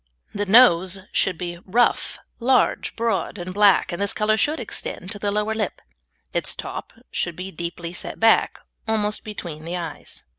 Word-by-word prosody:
The 205 0 -2
nose 190 -4 +6
should 185 -3 +1
be 175 -1 -5
rough, 235 +6 +2 0.2
large, 255 +2 +2
broad, 225 -3 -1
and 180 0 -6
black, 205 0 +4
and 175 - -4
this 200 - +1
colour 215 0 +2
should 295 +7 +1
extend 200 -4 -5
to 205 - -5
the 205 - -1
lower 210 +2 0
lip; 215 -3 -2 0.5
its - - 0
top - - -6 0.2
should 175 -2 -2
be 185 +2 -6
deeply 170 0 -5
set - - -5
back, 225 0 +4 0.3
almost 210 -1 0
between 170 -7 -7
the 170 +2 -3
eyes. 165 -4 -6
200 Hz, 170 wpm, -23 LUFS, 175-220 Hz, 0.5 s, nose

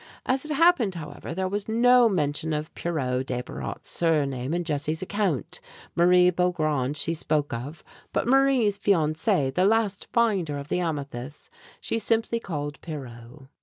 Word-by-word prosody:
As 260 +3 0
it 305 - -6
happened, 275 - +4
however, 155 -2 -7
there 190 0 -1
was 205 +2 -3
no 245 +1 +5
mention 155 -3 -1
of 150 +1 -4
Pierrot 130 -6 -2
Desbarat's 125 -1 -5
surname 140 -6 0
in 175 +1 0
Jessie's 155 +1 -2
account. 185 - -2 0.4
Marie 180 +1 +5
Beaugrand 155 -6 0
she 165 +3 0
spoke 150 -3 -1
of, 140 +7 -6 0.3
but - - -1
Marie's 260 -6 +3
fiancé, 155 -6 +1
the 180 - +2
last 205 -1 +1
finder 195 -11 +1
of 140 +1 -8
the - - 0
amethyst, 145 -5 -5 0.3
she 225 - -2
simply 225 +2 0
called 145 -8 -5
Pierrot. 130 -3 -9
165 Hz, 145 wpm, -26 LUFS, 145-205 Hz, 0.4 s, no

